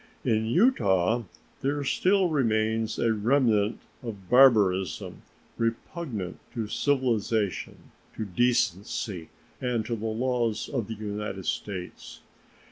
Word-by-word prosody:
In 110 0 +1
Utah 115 - +3 0.4
there 145 +2 0
still 185 +6 +2
remains 110 -5 +1
a 115 -1 +2
remnant 110 -2 +2 0.2
of 100 -6 -8
barbarism, 105 -9 +4 0.4
repugnant 115 - -3 0.2
to 115 -3 -2
civilization, 115 -6 0 0.4
to 110 - -2
decency, 100 -4 0 0.3
and 120 -4 -1
to 115 - -2
the 110 0 -4
laws 115 -1 -1
of 120 -7 -2
the 110 - -5
United 105 -2 -5
States. 90 -3 -5
110 Hz, 105 wpm, -27 LUFS, 105-125 Hz, 0.4 s, barbarism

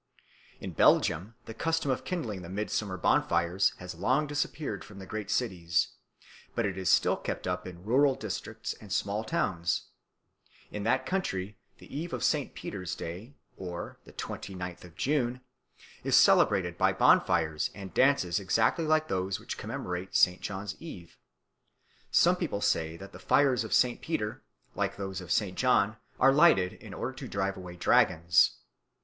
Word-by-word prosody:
In - - -6
Belgium 90 +8 +3
the 115 - -7
custom 160 +3 0
of 130 - -2
kindling 115 - -3
the 85 - -9
midsummer 100 -1 -2
bonfires 85 +2 +2
has 90 0 -7
long 130 - +1
disappeared 145 -6 -3
from 100 - -13
the 95 - -8
great 105 +1 -5
cities, 90 -8 0 0.7
but 115 - +1
it 95 -2 -2
is 95 -2 -1
still - - +4
kept - - -5
up 90 0 -2
in 90 -1 -10
rural 135 +4 +4
districts 110 +1 -5
and 105 -3 -12
small 100 +3 -1
towns. 85 -5 -1 0.8
In 105 - -4
that 130 +3 +2
country 105 - -2 0.2
the - - -12
Eve 165 +4 -4
of - - -3
St. 150 -3 0
Peter's 90 -4 -5
Day 95 - -7 0.2
(the 90 -2 -7
twenty 95 - -6
ninth 90 -1 -6
of 85 -3 -14
June) 125 -3 0 0.6
is - - +4
celebrated - - +4
by - - +4
bonfires 80 -1 +3
and 95 -4 -8
dances 130 -11 +3
exactly 110 - +1
like 155 0 +3
those 95 -3 -1
which - - -6
commemorate 90 +1 -5
St. 90 0 +4
John's 100 0 -5
Eve. 90 - -10 0.9
Some - - +4
people - - -2
say 80 0 0
that 100 +3 -10
the 90 - -11
fires 130 +5 +3
of 110 - -7
St. 125 -1 +3
Peter, 110 -10 -3 0.3
like - - -2
those 95 -1 -4
of 90 -1 -8
St. 95 -1 +1
John, 110 -4 +2 0.2
are 135 +1 +6
lighted 135 - +5
in - - -11
order - - -3
to - - -8
drive 100 0 -1
away 90 -1 -9
dragons. 85 0 +4
100 Hz, 160 wpm, -29 LUFS, 90-125 Hz, 0.9 s, are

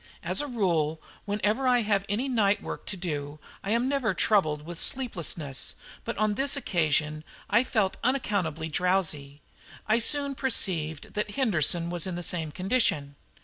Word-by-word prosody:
As - - 0
a 290 - -3
rule, 170 - 0 0.3
whenever 210 +5 0
I 245 -1 +4
have 200 -2 +1
any 225 +7 0
night 210 -5 +2
work - - -6
to 195 - -2
do, 150 -4 -4 0.3
I 195 - -4
am 235 +3 +2
never 260 -8 +1
troubled 155 -9 +2
with 170 0 -7
sleepiness, 170 - -3 0.3
but - - -4
on 215 0 +2
this 275 +5 +2
occasion 155 - +1 0.3
I 230 +4 +5
felt 215 -7 0
unaccountably 200 - 0
drowsy. 160 -5 0 0.4
I 220 +2 +3
soon 280 +4 0
perceived 170 - 0
that 210 -1 -2
Henderson 175 - +2
was 175 0 -1
in 185 - -3
the 175 - -4
same 160 -3 -1
condition. 180 - +1
195 Hz, 155 wpm, -28 LUFS, 160-230 Hz, 0.4 s, I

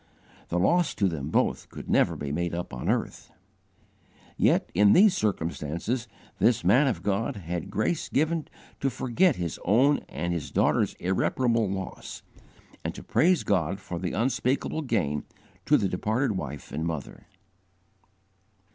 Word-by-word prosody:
The 85 - -1
loss 170 - +2
to 100 - +2
them 75 -5 -3
both - - 0
could - - -9
never - - +3
be 70 -1 -5
made 85 +3 -2
up 85 -5 -5
on 65 - -3
earth. - - -2 1.1
Yet - - +2
in 100 +3 +5
these 195 +1 +6
circumstances 95 - -2 0.3
this 115 -5 +3
man 125 +11 +5
of 125 - -2
God 100 +2 0
had 85 -3 -5
grace 125 +10 -1
given 160 +2 0 0.3
to 135 - +1
forget 135 +6 +2
his 85 -2 -4
own 130 +9 +4
and 85 0 -3
his 75 -5 -4
daughter's - - +1
irreparable 115 +4 +1
loss, 95 0 -6 0.6
and - - -4
to - - -9
praise 180 +1 +3
God 90 +3 0
for 90 -3 -6
the 90 -1 -3
unspeakable 130 +6 0
gain 90 - -1 0.4
to - - +6
the 100 - +1
departed 110 +8 0
wife 75 -7 -5
and 75 +3 -3
mother. 80 -4 -5
100 Hz, 145 wpm, -27 LUFS, 85-130 Hz, 1.1 s, these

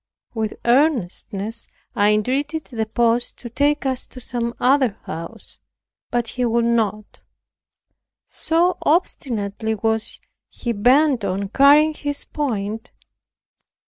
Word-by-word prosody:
With 220 -2 -2
earnestness 230 - 0 0.3
I 205 -2 +4
entreated 275 +9 0
the 225 -3 -3
post 235 +2 +1
to 240 - -9
take 290 +4 +1
us 260 -1 -2
to 255 - -11
some 240 -1 -3
other 260 -4 +3
house, 165 +1 -8 0.5
but 240 -1 -1
he 250 +2 -2
would 235 0 +1
not; 215 -3 -1 1.0
so 345 +3 +1
obstinately 220 - -1
was 220 +1 -2 0.3
he 240 - -4
bent 250 +3 +3
on 195 +1 -2
carrying 290 +6 +5
his 290 -1 -3
point. 225 -5 -3
235 Hz, 110 wpm, -21 LUFS, 220-280 Hz, 1.0 s, carrying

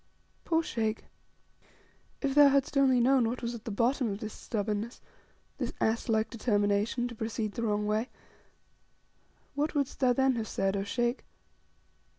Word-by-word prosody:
Poor 330 -1 +2
Sheikh! 220 -6 -2 1.2
if 275 -1 +1
thou 290 0 +8
hadst 275 +1 +1
only 265 -2 +4
known 250 -1 +4
what 245 +1 -5
was 235 0 -2
at 230 -2 -9
the - - -4
bottom 235 +4 +1
of 200 - -3
this 215 -1 -6
stubbornness 215 +2 -3 0.6
this - - -2
ass 225 +1 0
like 220 -1 +2
determination 210 +1 +1
to 240 - -8
proceed 220 -1 -3
the 230 - -5
wrong 210 -2 0
way 215 +4 0 1.4
what 295 +2 -1
wouldst 280 -2 -1
thou 255 -2 +4
then 265 0 +2
have 220 -1 -3
said, 195 0 0
0 200 0 -2
Sheikh? 240 +4 -1
230 Hz, 160 wpm, -30 LUFS, 215-260 Hz, 1.4 s, thou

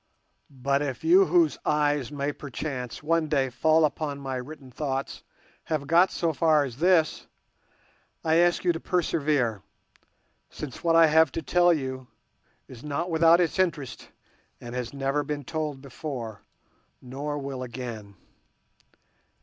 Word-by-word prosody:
But 140 0 -1
if 140 -3 -4
you 370 +4 +6
whose 340 -3 +3
eyes 145 -3 +1
may 145 0 -2
perchance 135 -3 -6
one 165 0 +1
day 135 -4 0
fall 155 +5 +3
upon 145 -1 -3
my 135 -1 -4
written 135 0 -9
thoughts 135 0 -4 0.4
have 155 -3 -2
got 170 +5 +4
so 165 -2 -1
far 155 0 +3
as 125 -4 -6
this, 170 -1 +2 1.0
I 160 0 +3
ask 175 0 +3
you 175 - +4
to 165 - -4
persevere, 145 - 0 0.9
since 140 -5 -8
what 165 -1 +3
I 165 0 +8
have 160 -1 +4
to 165 - -4
tell 175 +5 +4
you 130 -5 -3 0.6
is 125 -2 -12
not 155 +4 -3
without 165 +1 +5
its 175 +1 0
interest, 155 -8 -2 0.5
and 120 0 -9
it - - -4
has 120 -2 -5
never 140 +1 -1
been 145 0 -4
told 150 -1 -4
before, 125 -6 -6 0.6
nor 140 +4 -5
will 135 -2 -5
again. 120 -5 -7
145 Hz, 145 wpm, -26 LUFS, 130-160 Hz, 1.0 s, I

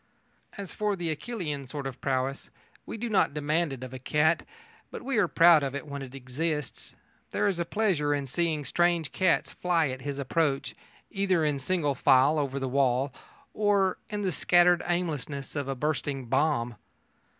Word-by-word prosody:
As 200 -2 -6
for 210 -1 0
the 170 -3 -2
Achillean 150 - -5
sort 140 +1 -6
of 135 -1 -6
prowess, 135 0 -2 0.4
we - - -5
do 240 +2 -3
not 200 -9 +2
demand 150 +2 0
it 130 -2 -7
of 130 0 -8
a 130 - -6
cat, 155 +5 +1 0.4
but - - -8
we 265 -1 -1
are 190 - +3
proud 165 -1 +6
of 140 -1 -3
it 140 - -5
when 140 -1 -6
it 135 0 -8
exists. 140 +2 -3 0.3
There 210 - 0
is 190 -4 0
a 170 - 0
pleasure 175 -7 +1
in 145 -1 0
seeing 155 +2 -1
strange 175 -2 +1
cats 185 -3 +1
fly 170 -4 +1
at 130 0 -5
his 140 +1 -4
approach, 140 -1 0 0.4
either 190 -5 +1
in 145 -2 0
single 150 0 0
file 135 +4 +4
over 140 -2 -2
the 135 -1 -2
wall 130 0 +1 0.4
or 200 -3 +2
in 210 -2 -3
the 190 - +1
scattered 175 +1 +4
aimlessness 150 -6 -3
of 145 -2 -2
a 135 - -2
bursting 140 -1 -2
bomb. 120 -3 0
150 Hz, 180 wpm, -28 LUFS, 135-175 Hz, 0.4 s, proud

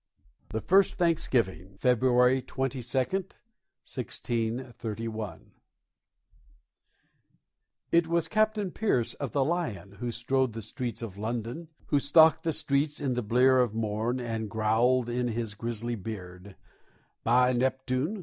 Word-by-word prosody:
THE 110 - -3
FIRST 190 - +3
THANKSGIVING 115 - 0
[February 125 +2 +3
22, 135 +1 -3
1631] 120 - -4 2.4
It 170 -1 +4
was 170 -1 +1
Captain 215 -3 +1
Pierce 130 - 0
of 135 -7 -5
the 135 - +2
Lion 105 - -3
who 120 - -3
strode 125 +1 0
the 115 0 -6
streets 120 +3 -4
of 100 -3 -7
London, 120 +8 -4 0.2
Who 145 - +3
stalked 160 +3 +5
the 165 -1 0
streets 145 0 +1
in 135 -3 -1
the 125 - -1
blear 125 +4 +4
of 120 -4 +1
morn 110 +3 -1
and 115 -3 -3
growled 115 +3 +2
in 120 +1 -1
his 115 -2 -3
grisly 115 +2 -4
beard; 95 -3 -8 0.7
_By 125 +2 +4
Neptune! 130 - 0
125 Hz, 120 wpm, -28 LUFS, 110-140 Hz, 2.4 s, stalked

